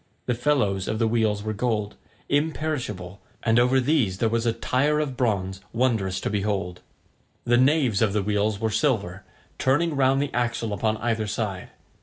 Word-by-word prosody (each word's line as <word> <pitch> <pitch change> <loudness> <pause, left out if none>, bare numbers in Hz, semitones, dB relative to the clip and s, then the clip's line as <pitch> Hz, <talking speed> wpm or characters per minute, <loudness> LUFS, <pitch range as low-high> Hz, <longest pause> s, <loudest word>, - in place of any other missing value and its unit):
The 125 - 0
felloes 120 -7 0
of 110 - -1
the 115 0 +2
wheels 110 -2 +1
were 110 - -2
of 105 - -6
gold, 105 -3 -1 0.3
imperishable, 140 - -2 0.2
and 115 0 +3
over 125 +2 +4
these 125 -9 +1
there 115 +3 +1
was 115 +1 0
a - - +4
tire 130 +6 +1
of 145 -4 -2
bronze, 95 -6 -1
wondrous 110 -6 0
to - - -2
behold. 100 -3 -2 0.6
The 120 0 +3
naves 130 -5 +3
of 110 -3 +3
the 105 0 0
wheels 105 0 0
were 110 0 -1
silver, 105 -5 0 0.4
turning 150 +4 +2
round 135 0 +3
the 145 0 -2
axle 120 -2 -1
upon 110 +1 0
either 110 -2 -1
side. 100 -3 -3
115 Hz, 175 wpm, -25 LUFS, 105-130 Hz, 0.6 s, over